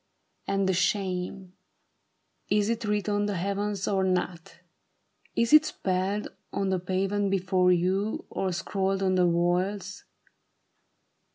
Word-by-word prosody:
And 195 -1 +1
the 190 - +2
shame! 185 0 -1 1.0
Is 210 0 +2
it 230 -1 -1
writ 210 -1 0
on 205 0 +1
the 205 - -2
heavens 200 +2 -2
or 195 -2 +1
not? 180 -2 -2 0.8
Is 235 +4 +1
it 305 0 +8
spelled 195 -6 -1 0.2
On 195 -1 -1
the 190 -1 +1
pavement 195 +3 0
before 185 -1 +2
you, 190 +4 0
or 190 -1 -1
scrawled 195 +1 -1
on 185 -1 +2
the 180 -1 +4
walls 180 +4 0
195 Hz, 125 wpm, -27 LUFS, 185-205 Hz, 1.0 s, it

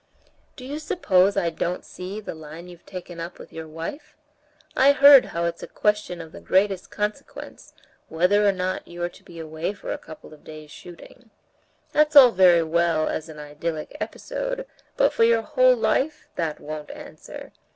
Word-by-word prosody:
"Do 255 - -10
you 290 +3 -5
suppose 200 - +2
I 170 -4 +1
don't 175 +2 -3
see 185 +3 -7
the 215 - -7
line 160 +2 -11
you've 175 -1 -15
taken 180 -2 -9
up 170 +1 -7
with - - -13
your 160 0 -7
wife? 165 - -8 0.6
I 275 +2 +5
heard 280 -1 +8
how 170 0 -3
it's 170 0 -3
a - - -7
question 210 -4 -1
of 165 -1 -9
the - - -11
greatest 195 -1 +1
consequence, 210 0 -6 0.4
whether 180 +6 +2
or - - +5
not 185 -1 -3
you're 175 0 -4
to - - -19
be 170 - -14
away 160 +3 -4
for 205 - -7
a - - -6
couple 155 -1 -13
of 150 - -17
days' 155 -1 -11
shooting. 225 +7 -14 0.6
That's 300 0 +2
all 260 -4 +10
very 180 -4 +5
well 165 -1 +1
as 160 +1 -4
an 155 - -10
idyllic 150 +2 -6
episode, - - -5 0.3
but - - +3
for - - +2
your 230 0 +3
whole 255 +3 +4
life 290 +6 -1
that 160 -3 -3
won't 150 0 -7
answer. - - -11
180 Hz, 180 wpm, -24 LUFS, 165-230 Hz, 0.6 s, all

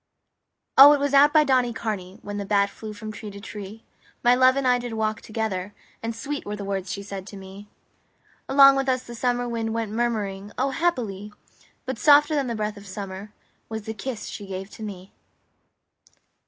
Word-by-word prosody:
XXXI - - +14
O, 290 +1 +10
it 290 - +1
was 285 0 -1
out 285 +1 +7
by 305 0 +5
Donnycarney 225 -8 -1
When 205 0 -5
the 200 - -3
bat 200 -1 +2
flew 215 +1 -8
from 215 +1 -7
tree 215 0 -8
to 200 0 -10
tree 210 +1 -9 0.4
My 245 - +6
love 255 +1 +5
and 275 -1 0
I 250 0 +4
did 240 -1 -6
walk 215 0 -1
together; 205 -3 -4 0.3
And 230 0 -4
sweet 285 +5 -4
were 205 - -5
the 205 -1 -6
words 195 -2 -3
she 200 - -5
said 195 -1 -7
to 205 - -9
me. 195 +2 -11 0.8
Along 275 0 +8
with 270 0 0
us 255 -1 0
the 240 - -10
summer 245 +1 -1
wind 225 -1 -2
Went 225 -2 -2
murmuring 210 -3 -2
O, 270 +1 0
happily! 230 - -2 0.5
But 260 -3 -4
softer 295 +1 +6
than 280 -3 0
the 235 - -2
breath 210 -1 -3
of 200 0 -12
summer 195 +1 -7 0.4
Was 220 -1 -5
the 220 - -5
kiss 230 +2 -5
she 205 - -7
gave 195 +1 -6
to - - -12
me. 195 -3 -8
220 Hz, 200 wpm, -24 LUFS, 200-255 Hz, 0.8 s, XXXI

